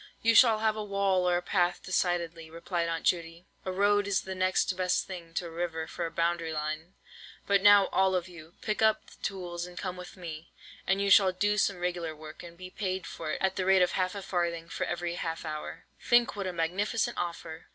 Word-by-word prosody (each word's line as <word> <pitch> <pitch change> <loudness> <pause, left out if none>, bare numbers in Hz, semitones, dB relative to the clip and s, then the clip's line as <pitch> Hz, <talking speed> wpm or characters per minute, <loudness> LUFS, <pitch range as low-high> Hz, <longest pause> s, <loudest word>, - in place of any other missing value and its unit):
"You 230 +1 +5
shall 230 -1 +7
have 215 0 +1
a 215 - -3
wall 195 -3 +1
or 175 - +3
a 175 - -4
path 175 -1 +1
decidedly," 170 -3 -1
replied 170 +1 -2
Aunt 165 0 -3
Judy: 170 0 0 0.2
"a 185 - -3
road 205 +1 +2
is 200 -1 +1
the 190 - -6
next 185 0 +1
best 180 0 +1
thing 175 -3 -8
to 180 - -1
a 170 - -7
river 165 -1 -3
for 170 +1 -4
a - - -9
boundary 170 -1 0
line. 155 +3 -4 0.5
But 200 -1 +3
now, 205 -1 +7
all 190 0 +3
of 180 -1 -1
you, 170 -1 -13
pick 215 0 -1
up 220 -1 +3
the - - -18
tools 175 -2 -4
and 180 - -13
come 180 - -4
with 180 +1 -10
me, 165 -2 -8 0.4
and 195 +1 +2
you 200 - +1
shall 190 -2 +7
do 205 +3 +1
some 195 -2 +1
regular 175 -2 -3
work, 155 0 -11
and 170 -1 -11
be 185 0 -9
paid 185 -3 -3
for 160 - -6
it - - -4
at 190 0 +1
the 185 - 0
rate 190 -1 +6
of 180 - +1
half 185 +1 -1
a 200 - -5
farthing 170 -3 -2
for 185 - -2
every 175 0 -2
half 165 -1 -4
hour. 155 -1 -6 0.2
Think 240 -2 +3
what 200 -2 -3
a 185 - -3
magnificent 190 +7 -1
offer!" 170 -2 -5
180 Hz, 225 wpm, -29 LUFS, 170-195 Hz, 0.5 s, shall